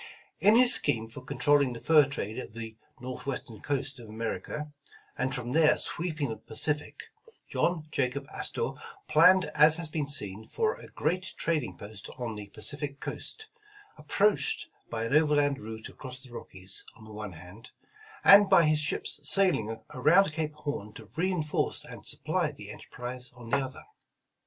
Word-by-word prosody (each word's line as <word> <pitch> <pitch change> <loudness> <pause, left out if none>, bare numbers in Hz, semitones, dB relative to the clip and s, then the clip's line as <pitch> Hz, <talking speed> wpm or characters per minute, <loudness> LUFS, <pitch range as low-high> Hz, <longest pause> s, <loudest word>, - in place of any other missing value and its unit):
IN 210 +2 +6
his 250 +1 +8
scheme 115 -1 +2
for 115 +4 -10
controlling 140 0 +2
the 115 - -7
fur 155 0 +6
trade 115 -4 -4
of 110 - -8
the 115 -1 -7 0.2
Northwestern 130 -2 -6
coast 140 -2 -2
of 115 -2 -11
America, 115 +7 -4 0.4
and 130 +1 -1
from 125 -1 -4
there 155 +1 +5
sweeping 155 -6 -2
the 110 - -4
Pacific, 150 +6 -2 0.5
John 170 -3 0
J 135 -4 +2
Jacob 135 +2 -6
Astor 465 - -2 0.4
planned 180 +4 +6
as 150 +1 +6
has 165 -1 -3
been 150 -2 -2
seen, 105 -6 -4
for 445 0 0
a - - -12
great 185 +1 -2
trading 145 - -1
post 100 0 -9
on 120 -3 -3
the 105 -1 -7
Pacific 145 +5 -5
coast, 440 - -6 0.5
approached 330 - +1 0.2
by 115 -1 -3
an 115 - -2
overland 145 -2 +3
route 110 +1 -7
across 130 0 -6
the 130 - -10
Rockies 95 -4 -5
on 110 - -15
the 110 - -11
one 105 -3 -6
hand; 90 +7 -12 0.5
and 200 0 +9
by 190 -3 +7
his 155 -1 +3
ships 150 0 -2
sailing 145 - +1
around 155 +6 +4
Cape 155 -1 -3
Horn 145 -8 -5
to - - -12
reinforce 165 -3 0
and - - -10
supply - - 0
the - - -8
enter - - -11
prise 125 +1 -6
on 120 -2 -11
the 140 - +4
other. 135 -1 -5
140 Hz, 165 wpm, -29 LUFS, 115-155 Hz, 0.5 s, and